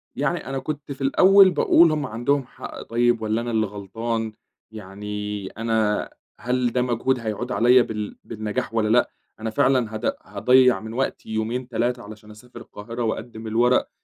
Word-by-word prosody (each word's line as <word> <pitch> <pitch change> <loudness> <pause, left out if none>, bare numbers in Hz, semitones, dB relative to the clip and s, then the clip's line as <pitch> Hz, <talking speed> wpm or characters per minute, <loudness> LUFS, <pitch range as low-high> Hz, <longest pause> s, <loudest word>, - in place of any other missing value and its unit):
يعني - - -1
أنا 135 0 -3
كنت 150 -1 -6
في 140 0 -8
الأول 190 +7 +6
باقول: 170 -2 +5
"هُم 150 -2 -1
عندهم 130 +4 -1
حق - - -9
طيب 120 0 +1
والّا 110 +1 0
أنا 120 0 -4
اللي 110 -1 +1
غلطان؟ 110 +3 -4 0.4
يعني 105 0 -6
أنا 110 -1 -1 0.3
هل 125 -1 0
ده 125 - +1
مجهود 125 +1 0
هيعُود 115 +2 -4
عليَّ 125 +1 +5
بال 105 -2 -5
بالنجاح 110 0 -4
والّا 110 -2 +1
لأ؟ 120 +2 +3 0.3
أنا 110 0 -3
فعلًا 120 -1 +1
هاض 110 - -5 0.2
هاضيّع 125 +1 +4
من 110 +1 -8
وقتي 135 -3 -3
يومين 115 +3 -2
3 120 0 -1
علشان 105 +1 -12
أسافر 120 +4 -13
القاهرة 115 +4 -7
وأقدِّم 110 0 -4
الورق؟" 120 +3 +2
115 Hz, 160 wpm, -23 LUFS, 110-125 Hz, 0.4 s, الأول